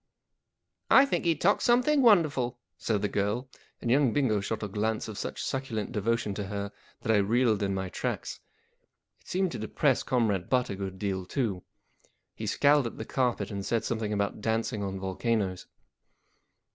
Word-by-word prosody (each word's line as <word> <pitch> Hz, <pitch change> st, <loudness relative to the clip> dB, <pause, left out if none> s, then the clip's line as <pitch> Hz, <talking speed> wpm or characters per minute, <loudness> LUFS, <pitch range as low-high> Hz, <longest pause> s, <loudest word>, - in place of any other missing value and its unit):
" -, -, -57 dB, 0.3 s
I 270 Hz, -, +8 dB
think 275 Hz, -, -1 dB
he 165 Hz, -1 st, +3 dB
talks 195 Hz, +7 st, +2 dB
something 250 Hz, +5 st, +4 dB
wonderful/ 165 Hz, -, +5 dB
1 120 Hz, -, -9 dB, 0.3 s
said 105 Hz, -3 st, 0 dB
the -, -, +3 dB
girl, 105 Hz, +6 st, -1 dB, 0.3 s
and 120 Hz, -, -1 dB
young 135 Hz, -3 st, +4 dB
Bingo 125 Hz, -8 st, +2 dB
shot 110 Hz, +3 st, -3 dB
a -, -, -1 dB
glance 110 Hz, +2 st, -1 dB
of 110 Hz, -, -6 dB
such -, -, -4 dB
succulent 125 Hz, -6 st, -3 dB
devotion 115 Hz, -1 st, 0 dB
at 100 Hz, -, -3 dB
her 100 Hz, 0 st, -4 dB, 0.3 s
that 110 Hz, -, 0 dB
I 110 Hz, -, +5 dB
reeled 110 Hz, +1 st, +2 dB
in 100 Hz, -1 st, 0 dB
my 95 Hz, 0 st, -2 dB
tracks. -, -, -4 dB, 0.8 s
It -, -, -26 dB
seemed 185 Hz, -1 st, 0 dB
to -, -, -5 dB
depress 140 Hz, -5 st, +1 dB
Comrade 110 Hz, -8 st, 0 dB
Butt 125 Hz, -3 st, +1 dB
a -, -, -3 dB
good 95 Hz, -1 st, -5 dB
deal 95 Hz, -2 st, -3 dB
too. 110 Hz, -9 st, -1 dB, 0.7 s
He -, -, -6 dB
scowled 145 Hz, -3 st, +4 dB
at -, -, -8 dB
the 110 Hz, -, -5 dB
carpet 125 Hz, -2 st, -1 dB
and 100 Hz, -1 st, -4 dB
said 115 Hz, +3 st, 0 dB
something 110 Hz, -2 st, -2 dB
about 100 Hz, 0 st, -1 dB
dancing 110 Hz, -1 st, -1 dB
on 95 Hz, -1 st, -3 dB
volcanoes. 95 Hz, 0 st, -1 dB
110 Hz, 185 wpm, -29 LUFS, 100-130 Hz, 0.8 s, I